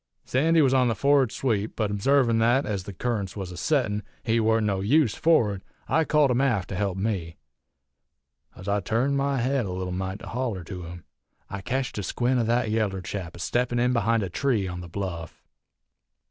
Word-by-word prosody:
Sandy 160 +4 +3
was 135 -1 +3
on 130 -2 +4
the 115 - 0
forrard 140 0 +3
sweep, 110 -4 -1
but 105 -3 -1
obsarvin' 115 +2 +3
thet, 120 +4 +3
ez 100 -3 -3
the - - -6
currents 100 -1 -3
was 95 -3 -5
a - - -8
settin', 105 - 0 0.2
he 115 0 +2
warn't 110 0 +2
no 100 -2 0
use 120 +3 +3
forrard, 110 - +2 0.3
I 160 +3 +2
called 150 -3 +3
him 125 +1 +2
aft 115 -10 +1
to 95 - -4
help 95 -1 -1
me. 95 -6 -2 1.2
Ez 95 - -11
I 100 +1 +1
turned 115 +9 0
my 140 0 0
head 130 -2 0
a - - -5
leetle 90 0 -4
mite 95 +1 -3
to - - -9
holler 115 -7 -3
to 90 +1 -7
him 85 0 -9 0.5
I 100 - -4
ketched 130 +2 -2
a - - -1
squint 125 +6 0
o' - - +2
that 120 -1 +1
yaller 105 -4 0
chap 90 -3 -5
a - - -11
steppin' 120 +10 0
in 125 +1 +2
behind 115 -1 +2
a 95 - -3
tree 115 -4 0
on 90 0 -5
the 85 - -9
bluff. 85 -3 -6
110 Hz, 205 wpm, -26 LUFS, 95-125 Hz, 1.2 s, on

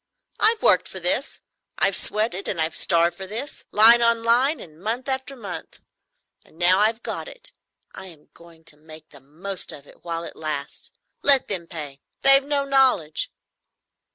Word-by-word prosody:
I've 440 +1 +3
worked - - +3
for - - -6
this, - - 0 0.4
I've - - +1
sweated 210 -2 0
and 170 - -2
I've 160 0 +3
starved 170 0 +3
for 190 -1 -8
this, 235 +9 -7
line 230 +3 +6
on 235 -1 +2
line 250 +6 +2
and 155 -5 -14
month 230 +6 -4
after 265 +1 -2
month. 225 -6 -8 0.6
And - - -24
now 180 +2 +3
I've 225 +2 +1
got - - -4
it - - -7 0.4
I 190 - -11
am 160 -5 -17
going 170 -1 -18
to 150 -2 -8
make 155 +1 -15
the 140 - -15
most 175 +8 -4
of 140 - -11
it - - -20
while 170 -1 -5
it - - -8
lasts. 150 -3 -5 0.3
Let 275 -2 +4
them 180 -5 -4
pay—they've 165 - +1
no 285 -1 0
knowledge." 265 - +1
195 Hz, 170 wpm, -22 LUFS, 160-255 Hz, 0.6 s, line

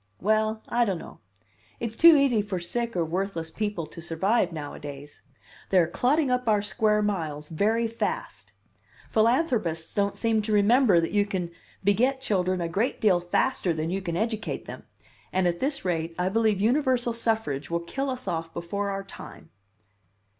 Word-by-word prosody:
"Well, 215 +2 +1
I 240 0 +2
don't 195 -6 0
know. - - -11 0.6
It's 230 -1 -4
too 335 +3 +8
easy 270 -6 +3
for 205 -2 -4
sick 230 +6 -3
or 170 -2 +1
worthless 165 -1 -3
people 205 -4 -3
to 165 - -11
survive 175 +5 +1
nowadays. 145 -2 -8 0.5
They 190 - +3
are 175 - +6
clotting 260 - +1
up 250 -1 0
our 210 -2 +3
square 210 0 +1
miles 155 -7 -3
very 220 +8 +1
fast. 230 +1 -4 0.6
Philanthropists 220 - +1
don't 200 -1 0
seem 225 -2 +1
to 215 +1 -2
remember 210 -1 +5
that 165 - -1
you 205 0 +2
can 180 -4 -3 0.3
beget 245 +7 +2
children 185 -7 0
a 170 - -1
great 200 +9 -1
deal 195 -5 +4
faster 175 +1 0
than 160 +1 -2
you 195 +1 -1
can 170 -3 -3
educate 220 +1 -2
them; - - -10 0.4
and 185 -1 +2
at 170 0 -1
this 275 -5 -2
rate 165 -2 -1
I 180 +1 +1
believe 215 -1 +2
universal 245 +1 +2
suffrage 220 -12 -1
will 170 0 -1
kill 270 +11 -3
us 255 -4 -5
off 165 -2 -3
before 200 +4 -3
our 195 0 -3
time." 195 -4 -12
200 Hz, 170 wpm, -26 LUFS, 170-230 Hz, 0.6 s, too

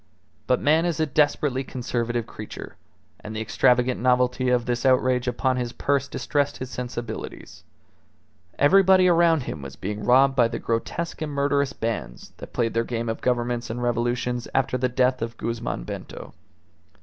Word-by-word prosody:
But 125 - +3
man 155 +3 +3
is 165 -3 -2
a 160 - +3
desperately 145 -2 +1
conservative 120 -2 -2
creature, 110 -2 -9 0.4
and 110 - -8
the - - -2
extravagant 125 +3 +2
novelty 125 0 +2
of 125 -1 +2
this 120 -1 -1
outrage 130 -1 +2
upon 130 +1 0
his 120 -1 -3
purse 140 -1 0
distressed 145 -1 -1
his 130 0 -6
sensibilities. 120 -2 -6 0.9
Everybody 185 +4 +5
around 170 -4 +4
him 80 - -6
was 70 -2 -8
being 105 +2 -5
robbed 135 +2 +5
by 120 -3 +4
the 115 - -4
grotesque 160 +9 -3
and 155 -1 -3
murderous 140 -1 +1
bands 115 - -5
that - - -10
played 115 -2 -1
their 115 - +1
game 115 -1 -3
of 115 - -3
governments 120 -1 -1
and 120 +2 -4
revolutions 120 +1 -1
after 135 -1 +1
the 125 0 0
death 125 +1 +1
of 115 0 -4
Guzman 115 - -3
Bento. - - -8
125 Hz, 160 wpm, -24 LUFS, 120-140 Hz, 0.9 s, Everybody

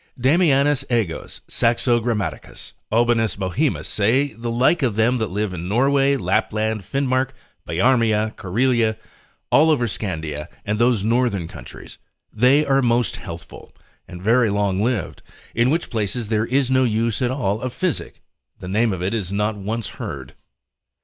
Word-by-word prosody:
Damianus 145 0 +3
A 120 -3 +2
Goes, 80 - -8
Saxo 120 +1 +2
Grammaticus, 105 - -4 0.2
Aubanus 115 -1 +2
Bohemus, 100 - -1
say 120 +6 +1
the 115 +2 -5
like 125 +8 +2
of 120 -6 +1
them 115 +4 +2
that 110 -4 -2
live 105 0 -2
in 90 0 -5
Norway, 135 +5 +2
Lapland, 110 -3 0
Finmark, 130 +5 -1 0.3
Biarmia, 110 +2 +2
Corelia, 115 +2 +1 0.5
all 155 +3 +5
over 140 -6 +2
Scandia, 80 -9 -4 0.2
and 105 +1 -1
those 120 -4 +2
northern 115 -6 +1
countries, - - -12 0.3
they 130 +7 +4
are 135 -1 +3
most 120 -4 +1
healthful, 85 0 -10 0.3
and 90 0 -10
very 115 +2 +3
long 100 -1 0
lived, 120 +1 -2 0.3
in 120 +2 +2
which 165 +4 -1
places 110 0 -2
there 110 0 0
is 130 0 +1
no 130 0 +4
use 115 -1 0
at 125 - +1
all 110 -5 -1
of 130 - -3
physic, 180 +6 -3 0.3
the - - -9
name 110 +3 +1
of 90 -1 -4
it 95 - -1
is 100 -5 -2
not 105 +2 0
once 105 +2 -4
heard. - - -7
115 Hz, 155 wpm, -21 LUFS, 105-130 Hz, 0.5 s, all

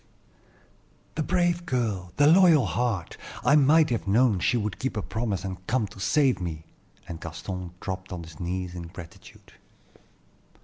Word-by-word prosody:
"The 160 - -2
brave 175 +1 +1
girl! 105 -8 -1
the 145 - +4
loyal 165 - +6
heart! 100 0 -2 0.3
I 140 - +6
might 150 +1 +5
have 115 -4 -2
known 110 0 +3
she 120 - +2
would 105 -3 -3
keep 135 - -2
her 105 - -2
promise, 105 -3 -3
and 95 -1 -7
come 120 -1 +1
to - - -14
save 135 +2 +2
me;" 80 -3 -5 0.4
and 85 -1 -7
Gaston 90 +2 -6
dropped 95 0 -6
on 90 -2 -5
his 80 -2 -13
knees 90 0 -3
in 85 -2 -7
gratitude. 85 0 -13
100 Hz, 160 wpm, -26 LUFS, 90-130 Hz, 0.4 s, loyal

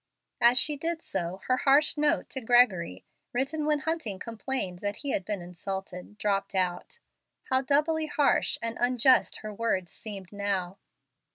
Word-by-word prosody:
As 240 +1 +6
she 300 +2 +3
did 330 +2 -3
so, 185 0 -3
her 255 - +2
harsh 285 +3 +4
note 295 -1 +1
to 265 - -2
Gregory, 215 - +3 0.3
written 290 +5 -1
when 300 -2 +1
Hunting 315 - -2
complained 225 -4 -4
that 205 +1 -3
he 280 - 0
had 195 - -1
been 200 -2 -4
insulted, 185 +2 -6
dropped 195 -2 -1
out. 185 - -1 0.5
How 260 0 +3
doubly 305 +3 +1
harsh 295 -1 +2
and 230 0 -3
unjust 250 +1 +3
her 215 - -5
words 200 -5 -1
seemed 200 -3 -8
now! 200 -2 -2
230 Hz, 155 wpm, -28 LUFS, 190-275 Hz, 0.5 s, As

